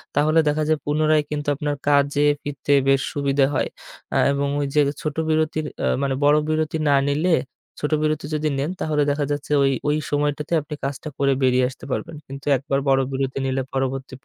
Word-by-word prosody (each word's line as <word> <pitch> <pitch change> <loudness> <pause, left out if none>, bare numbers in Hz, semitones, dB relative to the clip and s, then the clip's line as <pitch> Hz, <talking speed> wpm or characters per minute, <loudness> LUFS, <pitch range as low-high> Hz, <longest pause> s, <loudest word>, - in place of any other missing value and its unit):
তাহলে 155 +3 +3
দেখা 150 +1 +1
যায় 155 - +2
পুনরায় 155 0 +2
কিন্তু 145 -1 -4
আপনার 145 +1 -2
কাজে 145 0 +3 0.2
ফিরতে 145 0 -4 0.2
বেশ 135 0 +4
সুবিধা 140 -1 +2
হয়। - - +1 0.5
আ - - +4
এবং 140 0 0
ওই 145 - 0
যে - - +5 0.2
ছোট 150 -2 -3
বিরতির 155 0 0 0.2
আ - - +2 0.2
মানে 135 -1 0
বড় 145 +1 +5
বিরতি 155 0 0
না 140 - +5
নিলে, 160 +4 +2 0.4
ছোট 150 - -2
বিরতি 155 -1 0
যদি 155 0 0
নেন 145 +6 -1
তাহলে 150 -2 +1
দেখা 145 0 -1
যাচ্ছে 145 0 -4
ওই, 135 - +3 0.2
ওই 150 +1 +2
সময়টাতে 145 +2 -1
আপনি 150 +1 -7
কাজটা 140 +3 -4
করে 140 -1 +2
বেরিয়ে 130 0 +3
আসতে 135 - -12
পারবেন। 160 - -3
কিন্তু 135 +1 -9
একবার 135 +1 -1
বড় 135 0 +4
বিরতি 135 0 -2
নিলে 135 0 0
পরবর্তী 135 0 -2
145 Hz, 190 wpm, -22 LUFS, 135-155 Hz, 0.5 s, যে